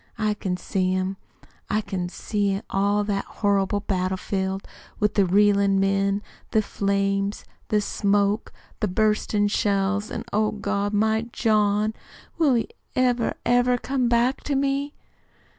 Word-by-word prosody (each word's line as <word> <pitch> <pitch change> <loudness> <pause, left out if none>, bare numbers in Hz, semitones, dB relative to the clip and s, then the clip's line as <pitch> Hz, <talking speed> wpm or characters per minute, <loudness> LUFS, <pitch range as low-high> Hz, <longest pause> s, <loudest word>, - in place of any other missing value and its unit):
I 215 -1 +1
can 185 -3 -3
see 185 0 -1
him. 185 +1 -1 0.5
I 215 - +1
can 190 -4 -4
see 200 0 -1
all 200 +1 +2
that 200 -1 -1
horrible 200 -1 0
battle 185 -2 -1
field 190 0 -3 0.3
with 210 0 +2
the 200 -2 +3
reelin' 200 0 +4
men, 195 +1 +1 0.3
the 220 - +2
flames, 200 0 -1 0.2
the 210 -1 +2
smoke, 205 +1 +1 0.3
the 215 - +1
burstin' 210 +1 +1
shells, 205 0 0
an', 235 -1 -5
oh, 215 +1 +2
God 205 -1 -1
my 220 +2 +1
John! 215 -1 +2 0.5
Will 290 -6 +4
he 230 - 0 0.3
ever, 245 -2 +1
ever 245 +1 +3
come 255 -1 -1
back 240 +3 +2
to 285 - 0
me?" 275 +1 0
205 Hz, 140 wpm, -24 LUFS, 195-220 Hz, 0.5 s, reelin